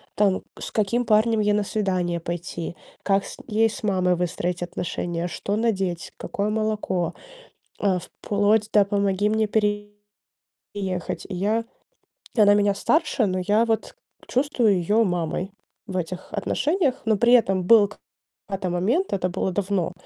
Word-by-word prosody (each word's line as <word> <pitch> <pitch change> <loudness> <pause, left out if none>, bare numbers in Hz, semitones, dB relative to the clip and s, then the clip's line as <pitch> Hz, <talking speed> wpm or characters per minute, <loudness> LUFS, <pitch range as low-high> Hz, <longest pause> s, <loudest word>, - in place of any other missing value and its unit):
там: 200 -2 +2 0.2
с - - -6
каким 230 +3 +1
парнем 220 0 +3
ей 210 0 +2
на 210 - +2
свидание 185 -5 -1
пойти, 170 0 -5 0.3
как 195 0 +2
с - - -8
ей 225 0 +3
с 220 - -8
мамой 185 -3 +2
выстроить 175 0 -2
отношения, 175 -1 -3
что 200 +3 -3
надеть, 195 -7 -1
какое 205 +1 -2
молоко, 210 -5 -1 0.7
э, 190 -3 +2
вплоть 205 +4 0
до: 210 - +6
"Помоги 200 0 +1
мне 220 0 +1
переехать". 205 -1 -2 1.1
И - - -5
я 215 +5 0 0.7
и 220 - +3
она 205 -1 +7
меня 205 -1 +3
старше, 305 -4 +1
но 185 -1 -1
я 215 +2 +4
вот 225 -1 -1 0.3
чувствую 245 -7 +2
её 210 +6 +2
мамой 175 +1 -2 0.4
в 185 - -5
этих 180 +1 -5
отношениях. 300 -2 0
Но 220 - +3
при 240 +2 +5
этом 195 -6 +3
был 210 +1 +6
к 210 - -15 0.5
да-то 195 -2 -3
момент, 225 - 0
это 185 -1 0
было 190 - -1
давно, 190 -2 -1
205 Hz, 150 wpm, -24 LUFS, 185-220 Hz, 1.1 s, она